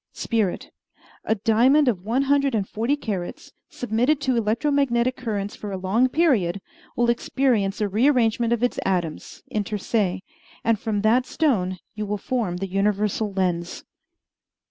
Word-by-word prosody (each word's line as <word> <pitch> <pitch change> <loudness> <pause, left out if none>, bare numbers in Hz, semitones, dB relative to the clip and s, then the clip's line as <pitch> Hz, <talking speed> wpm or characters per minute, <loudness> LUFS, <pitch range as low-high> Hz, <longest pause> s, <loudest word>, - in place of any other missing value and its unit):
Spirit 220 -6 -2 0.5
A 220 - +2
diamond 240 +8 +4
of 210 -8 +1
one 240 +6 +1
hundred 275 -2 +2
and 200 -3 -1
forty 230 +6 0
carats, 200 -10 -5 0.2
submitted 245 +5 0
to 260 -3 +1
electro 230 +6 0
magnetic 255 -3 +1
currents 205 -5 -4
for 205 - -7
a 190 - -3
long 205 +8 +2
period, 250 - +2 0.4
will 240 -2 +2
experience 235 -5 0
a 210 - +2
rearrangement 230 +1 +2
of 235 0 +1
its 245 - 0
atoms 175 -5 -3
inter 210 0 -2
se 195 -3 -1 0.4
and 225 -2 +2
from 210 -2 -1
that 235 +4 +3
stone 190 - 0 0.2
you 210 -1 -4
will 210 +1 -1
form 205 -5 -2
the 195 +2 -3
universal 205 +2 0
lens. 180 -3 -2
220 Hz, 150 wpm, -23 LUFS, 195-250 Hz, 0.5 s, diamond